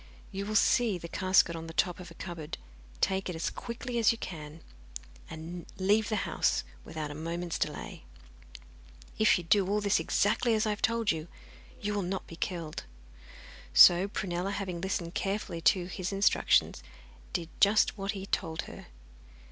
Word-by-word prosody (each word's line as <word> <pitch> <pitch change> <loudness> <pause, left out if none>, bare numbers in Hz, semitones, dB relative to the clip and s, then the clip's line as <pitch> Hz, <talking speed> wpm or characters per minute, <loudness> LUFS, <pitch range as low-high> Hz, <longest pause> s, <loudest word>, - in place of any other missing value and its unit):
You 200 0 -4
will 215 - -3
see 220 -1 +3
the 170 - -8
casket 185 -1 +3
on 165 0 -6
the 165 - -9
top 180 -1 +1
of 180 - -9
a - - -14
cupboard, 170 -4 -6 0.4
take 190 0 +1
it 180 - -4
as 160 - -2
quickly 235 0 -4
as 225 - +5
you 230 - -3
can, 155 -5 -8 0.7
and 165 +2 -8
leave 205 +3 +2
the 215 - 0
house - - +1 0.2
without 155 -2 -5
a - - -5
moment's 165 +3 -4
delay. - - -4 1.1
If 220 - +5
you 175 - -5
do 190 +3 +3
all 210 +1 +2
this 205 -1 +2
exactly 225 +3 +2
as 215 +1 +1
I 215 - +1
have 210 - -4
told 230 -1 +2
you, 160 0 -4 0.5
you 210 0 -1
will 205 - 0
not 190 +1 -3
be 165 - -10
killed.' 165 -2 -4 0.9
So 175 - +8
Prunella, 185 -2 -3
having 190 -4 -4
listened 180 -2 -2
carefully 195 -4 -2
to 180 0 -1
his 185 +1 -4
instructions, 195 +1 +3 0.5
did 170 -3 -3
just 205 +2 +4
what 200 0 -3
he 195 - -6
had 195 - -10
told 160 -3 -1
her. - - -11
190 Hz, 175 wpm, -30 LUFS, 170-205 Hz, 1.1 s, So